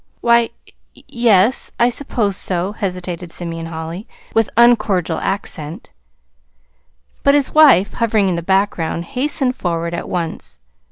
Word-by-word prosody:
"Why, 235 -1 +4 0.5
y - - -14
yes, 230 -1 +2
I 240 - +4
suppose 230 -5 -1
so," 185 0 -1
hesitated 180 -4 -5
Simeon 165 -1 -5
Holly, 165 +6 -7 0.3
with 225 -1 +2
uncordial 225 -7 +3
accent. 160 -5 -5 1.3
But 280 0 +4
his 285 -2 +1
wife, 285 - +6
hovering 220 -4 +1
in 180 - 0
the 170 - -3
background, 175 -2 0
hastened 265 -1 0
forward 170 -1 -3
at 170 - -5
once. 165 - -4
195 Hz, 125 wpm, -18 LUFS, 170-235 Hz, 1.3 s, wife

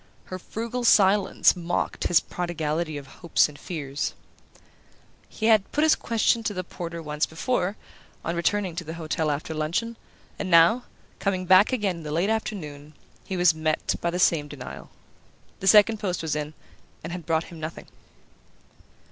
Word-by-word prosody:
Her 185 - -7
frugal 235 +6 -4
silence 200 -4 +4
mocked 175 -1 -2
his 170 - +5
prodigality 160 -2 -3
of 140 - -8
hopes 165 +4 +1
and 150 -1 -13
fears. 145 -5 -4 1.1
He 220 - -4
had 220 -3 +4
put 300 - +1
his 315 - +6
question 230 0 +1
to 210 -2 -3
the 185 - -3
porter 170 -2 -7
once 150 0 -1
before, 195 +3 -1 0.5
on 170 - -1
returning 185 +1 0
to 175 - -2
the 160 +1 -7
hotel 160 -1 -2
after 150 +2 -3
luncheon; 170 +10 -2 0.4
and 190 - -3
now, 170 +9 +5 0.3
coming 185 -2 -1
back 185 +5 +6
again 205 -8 0
in 165 - -9
the 150 - -5
late 175 +7 +1
afternoon, 155 -9 -4 0.3
he 190 - -4
was 175 -2 +5
met 155 0 -1
by 170 - 0
the 175 - -2
same 165 -4 +3
denial. 145 -4 -9 0.7
The 190 - -3
second 215 +2 +6
post 185 -5 -2
was 155 -2 -1
in, 150 0 -4 0.5
and 165 +2 -5
had 175 -3 -7
brought 160 -1 +1
him 165 - -10
nothing. 155 +1 -6
175 Hz, 165 wpm, -25 LUFS, 155-200 Hz, 1.1 s, his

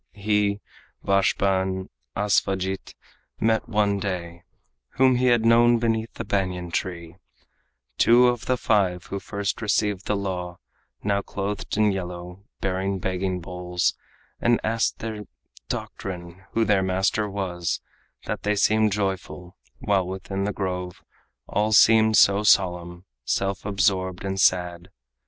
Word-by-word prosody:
He, 105 0 0 0.4
Vashpa 100 0 +2
and 95 0 -3 0.3
Asvajit 95 -2 0 0.4
met 110 0 +1
one 100 -2 +1
day, 85 -3 -4 0.6
Whom 130 -1 +5
he 125 +1 +2
had 120 -2 +3
known 120 +1 +5
beneath 115 -1 -1
the - - -5
banyan 90 -3 -2
tree, 85 -1 -4 0.8
Two 120 +2 +6
of 125 0 -1
the 130 - +2
five 95 -7 +1
who 100 - -5
first 100 +2 -3
received 105 -2 0
the 105 - +1
law, 90 -3 -4 0.5
Now 100 -1 +1
clothed 100 0 -4
in 105 -1 +4
yellow, 90 0 -6 0.2
bearing 95 +1 -1
begging 95 0 -2
bowls, 90 +1 -1 0.4
And 120 0 +3
asked 115 +1 0
their 110 -2 -6 0.4
doctrine, 90 0 -6
who 115 0 +2
their 100 -2 +3
master 95 +3 0
was, 90 -4 -2 0.5
That - - -3
they 105 +1 0
seemed 110 0 +3
joyful, 95 -2 -3 0.2
while 95 +3 0
within 95 +1 -4
the 105 - -1
grove 90 -3 -4 0.4
All 105 +1 0
seemed 110 0 +6
so 100 +1 +5
solemn, 90 -3 +2 0.2
self 95 +8 -1
absorbed 95 -2 0
and 95 0 -1
sad. 90 -1 +1
100 Hz, 130 wpm, -24 LUFS, 90-105 Hz, 0.8 s, Two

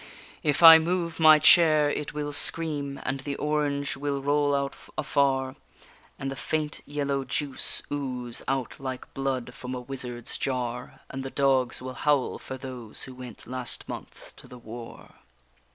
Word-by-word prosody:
_ - - -15 0.4
If 150 +2 0
I 165 -1 +12
move 170 0 -2
my 155 -1 +8
chair 155 -1 +6
it 150 - -4
will 145 -1 -4
scream, 145 -3 +2
and 135 +2 -2
the 140 +1 -4
orange 145 -2 -1
will 140 0 -2
roll 145 +1 +1
out 140 0 -2 0.2
afar, 135 -3 +1 0.6
And 135 0 -4
the - - -5
faint 155 +1 -3
yellow 140 -1 -1
juice 135 +2 -1
ooze 125 -4 -4
out 135 -2 -2
like 130 -2 -6
blood 130 -3 -3
from 130 -1 -6
a - - -4
wizard's 125 -2 -4
jar; 125 -2 -3
And 135 - -5
the 135 - -5
dogs 130 -3 +1
will 130 0 -5
howl 145 -1 +1
for 130 - -7
those 125 -4 -6
who 130 - -6
went 125 -3 -10
last 125 0 -3
month - - -9
to - - -11
the 125 - -12
war. 115 0 -11
135 Hz, 165 wpm, -27 LUFS, 130-145 Hz, 0.6 s, I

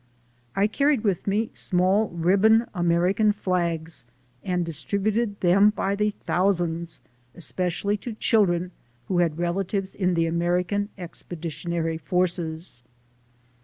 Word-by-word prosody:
I 200 - +3
carried 275 +3 +2
with 200 -4 0
me 215 +3 0
small 190 +4 +2
ribbon 200 +7 +4
American 180 +4 +2
flags, 170 -5 -1 0.4
and 180 -2 0
distributed 200 +7 -1
them 195 +3 +5
by 200 -2 -1
the 210 +1 0
thousands, 170 -3 0 0.4
espe 180 +1 -2
cially 200 +4 -1
to 235 +3 -6
children 185 -6 +2 0.4
who 180 - +2
had 165 -3 +1
relatives 190 +3 -1
in 180 -2 0
the 165 0 +2
American 175 +4 0
Expeditionary 165 -2 -4
Forces. 165 -4 -2
180 Hz, 115 wpm, -25 LUFS, 170-205 Hz, 0.4 s, them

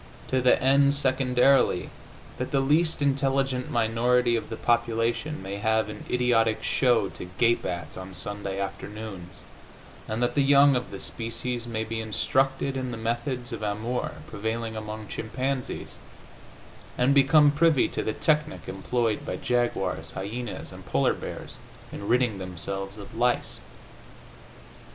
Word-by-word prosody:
To 130 - +2
the 125 - +4
end, 140 +2 +4
secondarily, 130 -1 +3 0.5
that 125 - -2
the 140 - +1
least 150 +3 +2
intelligent 135 -1 +1
minority 120 0 +2
of 115 - -3
the 115 - -4
population 115 +4 0
may 100 +1 -5
have 110 +1 +1
an 105 0 -8
idiotic 115 -3 +2
show 120 -6 +3
to 85 +1 -8
gape 120 +2 +3
at 85 -3 -5
on 95 0 -8
Sunday 100 0 -4
afternoons, 100 -1 -6 0.7
and 110 +3 -1
that 120 0 +1
the 140 - +2
young 140 0 +6
of 125 0 -2
the 100 - -7
species 115 +3 -4
may 110 -1 -2
be 115 0 -4
instructed 135 +5 0
in 130 -1 -2
the 120 - -5
methods 120 +2 -3
of 115 - -5
amour 110 +4 -2
prevailing 110 +3 -3
among 110 0 -6
chimpanzees 130 +5 -3 1.0
and 130 +3 +3
become 145 +2 +6
privy 150 -1 +3
to - - -2
the 110 - -2
technic 150 +2 0
employed 110 +3 -1
by - - -3
jaguars, 95 -10 -1
hyenas 110 +4 -5
and - - -11
polar - - +2
bears - - -8 0.3
in 100 - -7
ridding 120 -4 +2
themselves 95 +2 -5
of 110 +3 -10
lice. 120 +2 0
120 Hz, 140 wpm, -26 LUFS, 110-130 Hz, 1.0 s, young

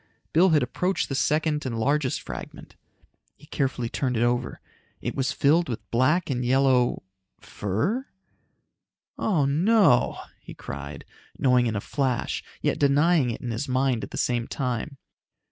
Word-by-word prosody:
Bill 180 +4 +5
had 155 -4 +3
approached 180 +9 -1
the - - -2
second 150 +2 +1
and 120 -4 -3
largest 140 +3 0
fragment. - - -9 0.6
He 150 - -17
carefully 135 -5 -2
turned 125 0 -2
it 115 - +2
over. 120 +1 -1 0.4
It - - -4
was 130 -2 -1
filled 155 +6 +2
with 115 - -5
black 150 +9 +2
and 125 -1 -1
yellow... 130 -2 +2 0.4
fur? 180 - -2 1.1
"Oh 165 -10 +1
no!" 160 - +3 0.2
he - - -12
cried, 70 0 -8 0.3
knowing 125 -2 +3
in 110 - -2
a 100 - -2
flash, 130 -2 -2 0.2
yet - - 0
denying 145 0 +3
it 115 - -5
in 120 - -4
his 120 +5 -4
mind 130 -2 +1
at - - -6
the - - -7
same 120 -2 0
time. 130 +1 -3
130 Hz, 150 wpm, -25 LUFS, 120-150 Hz, 1.1 s, Bill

